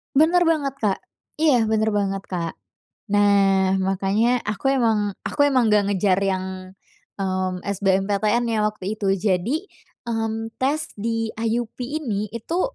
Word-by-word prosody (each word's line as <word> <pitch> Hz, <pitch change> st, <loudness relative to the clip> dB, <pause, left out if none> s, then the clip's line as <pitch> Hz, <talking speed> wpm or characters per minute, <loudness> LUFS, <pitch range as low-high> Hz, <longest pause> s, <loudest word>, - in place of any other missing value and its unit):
Bener 335 Hz, +4 st, +4 dB
banget, 290 Hz, -5 st, +1 dB
Kak. 205 Hz, -3 st, 0 dB, 0.4 s
Iya 270 Hz, -8 st, +3 dB
bener 220 Hz, 0 st, +1 dB
banget, 195 Hz, -1 st, -1 dB
Kak. 170 Hz, -2 st, -3 dB, 0.6 s
Nah, 195 Hz, -2 st, +4 dB
makanya 200 Hz, +6 st, +1 dB
aku 240 Hz, +6 st, 0 dB
emang 220 Hz, -6 st, +1 dB, 0.2 s
aku 285 Hz, -, +1 dB
emang 255 Hz, -5 st, +3 dB
enggak 210 Hz, -1 st, +4 dB
ngejar 190 Hz, -1 st, +2 dB
yang, 190 Hz, -1 st, 0 dB, 0.7 s
mmm, 185 Hz, -1 st, -1 dB
SBMPTN 200 Hz, +3 st, +1 dB
ya 220 Hz, -2 st, +1 dB
waktu 210 Hz, -1 st, -2 dB
itu. 200 Hz, -2 st, 0 dB
Jadi, 210 Hz, -, 0 dB, 0.4 s
mmm, 225 Hz, 0 st, -3 dB
tes 295 Hz, +4 st, -1 dB
di 225 Hz, +1 st, -2 dB
IUP 230 Hz, +1 st, -2 dB
ini 240 Hz, -8 st, -3 dB
itu 235 Hz, +10 st, -3 dB
215 Hz, 130 wpm, -23 LUFS, 195-240 Hz, 0.7 s, Bener